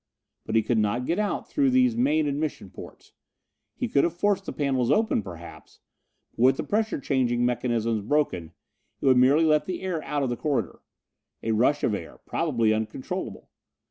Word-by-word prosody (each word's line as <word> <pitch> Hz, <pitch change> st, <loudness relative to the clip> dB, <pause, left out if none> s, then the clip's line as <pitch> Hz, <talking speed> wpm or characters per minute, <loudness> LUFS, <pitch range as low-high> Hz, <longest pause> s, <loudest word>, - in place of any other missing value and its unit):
But 110 Hz, -, -2 dB
he 110 Hz, -, +4 dB
could 115 Hz, 0 st, +1 dB
not 110 Hz, +4 st, 0 dB
get 170 Hz, +7 st, 0 dB
out 210 Hz, -1 st, -2 dB
through 280 Hz, -2 st, +1 dB
these 255 Hz, -2 st, +3 dB
main 155 Hz, -, +2 dB
admission 145 Hz, -9 st, -3 dB
portes. -, -, -12 dB, 0.6 s
He -, -, -2 dB
could 140 Hz, -, +2 dB
have 170 Hz, 0 st, -1 dB
forced 195 Hz, 0 st, 0 dB
the -, -, -2 dB
panels 130 Hz, -4 st, 0 dB
open 220 Hz, -, +2 dB
perhaps; 85 Hz, -3 st, -11 dB, 0.5 s
but -, -, -8 dB
with 130 Hz, +1 st, +5 dB
the -, -, -2 dB
pressure 220 Hz, -2 st, -1 dB
changing 120 Hz, -3 st, 0 dB
mechanisms 115 Hz, -2 st, 0 dB
broken, 145 Hz, -, 0 dB, 0.5 s
it -, -, -5 dB
would 130 Hz, -2 st, +5 dB
merely 140 Hz, +6 st, +5 dB
let 155 Hz, -1 st, +2 dB
the 185 Hz, 0 st, -4 dB
air 180 Hz, -4 st, -2 dB
out 145 Hz, 0 st, -2 dB
of 130 Hz, -, -1 dB
the -, -, -1 dB
corridor. 130 Hz, -, -2 dB, 0.6 s
A 115 Hz, -, 0 dB
rush 125 Hz, +7 st, +2 dB
of 110 Hz, -, +2 dB
air, 85 Hz, -5 st, -6 dB
probably 115 Hz, -9 st, +1 dB
uncontrollable. 110 Hz, 0 st, -5 dB
135 Hz, 180 wpm, -26 LUFS, 115-165 Hz, 0.6 s, with